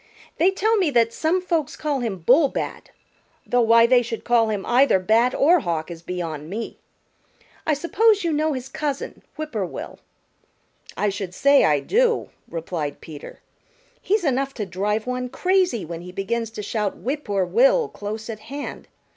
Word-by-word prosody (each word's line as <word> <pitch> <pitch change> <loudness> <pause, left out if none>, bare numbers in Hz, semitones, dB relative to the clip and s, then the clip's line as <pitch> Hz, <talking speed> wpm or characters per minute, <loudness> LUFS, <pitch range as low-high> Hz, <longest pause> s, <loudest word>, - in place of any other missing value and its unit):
They 355 - +5
tell 435 +4 +1
me 370 -6 +2
that 230 -4 +2
some 345 +7 0
folks 330 -6 -1
call 295 -3 -1
him 205 -8 -4
Bullbat, 275 +3 +2 0.6
though 245 0 +2
why 230 0 +6
they 245 +1 +5
should 230 -1 -5
call 235 -2 +3
him 205 -3 -2
either 250 -2 +4
Bat 225 +6 +2
or 340 +5 +5
Hawk 170 - -3
is 165 -1 -8
beyond 165 -4 -5
me. 220 +4 -5 0.9
I 305 - +3
suppose 405 +7 +2
you 335 -2 0
know 305 +1 +1
his 255 -1 -5
cousin, 285 0 -4
Whip 310 0 -5
poor 215 -4 -1
will." 180 - -7 1.0
"I 210 - +1
should 195 -2 -5
say 280 0 +5
I 150 -2 +3
do," 470 - +1 0.2
replied 160 -3 -4
Peter. 150 -3 -11 0.6
"He's 415 0 +1
enough 275 -2 0
to 215 - -3
drive 205 +4 -2
one 250 0 -3
crazy 360 - +1
when 170 +1 -6
he 180 +1 -9
begins 225 +5 -2
to 210 - -4
shout 210 -1 -2
'Whip 285 +4 -3
poor 200 -3 0
Will' - - +3
close 215 - -6
at 220 -2 -6
hand. 280 +7 -7
240 Hz, 170 wpm, -23 LUFS, 200-305 Hz, 1.0 s, why